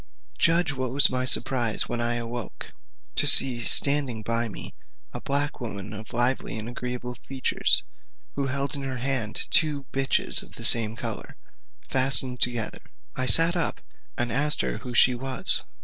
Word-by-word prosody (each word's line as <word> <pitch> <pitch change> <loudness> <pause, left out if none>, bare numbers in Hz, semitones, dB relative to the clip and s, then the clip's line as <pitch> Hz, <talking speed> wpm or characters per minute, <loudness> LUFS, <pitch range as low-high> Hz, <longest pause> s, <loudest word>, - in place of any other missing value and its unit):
Judge 170 -3 +2
what 130 -1 -4
was 140 +2 +4
my 130 0 -3
surprise 120 -3 +2
when 120 -1 -4
I 120 0 -2
awoke, 120 0 -8 0.4
to - - +3
see 120 -3 +7
standing 140 -6 +2
by 115 +1 -2
me - - -10 0.4
a - - -6
black 140 0 -3
woman 105 -3 -7
of 110 0 -9
lively 120 0 -1
and 110 +1 -6
agreeable 125 0 -7
features, 130 +1 -2 0.5
who 140 -1 -4
held 140 +1 -4
in 140 - -5
her 135 -1 -5
hand 120 -4 -3
two 150 -3 +2
bitches 135 0 +3
of - - -15
the - - -3
same 115 -1 +6
colour, - - -7 0.5
fastened 130 -1 +1
together. 120 -3 -1 0.4
I 130 0 -4
sat 165 +4 +5
up, 170 -3 -2 0.4
and 120 -1 -2
asked 150 +5 0
her - - -5
who 125 -2 -9
she 125 - +4
was? 130 +1 -1
125 Hz, 165 wpm, -24 LUFS, 120-135 Hz, 0.5 s, see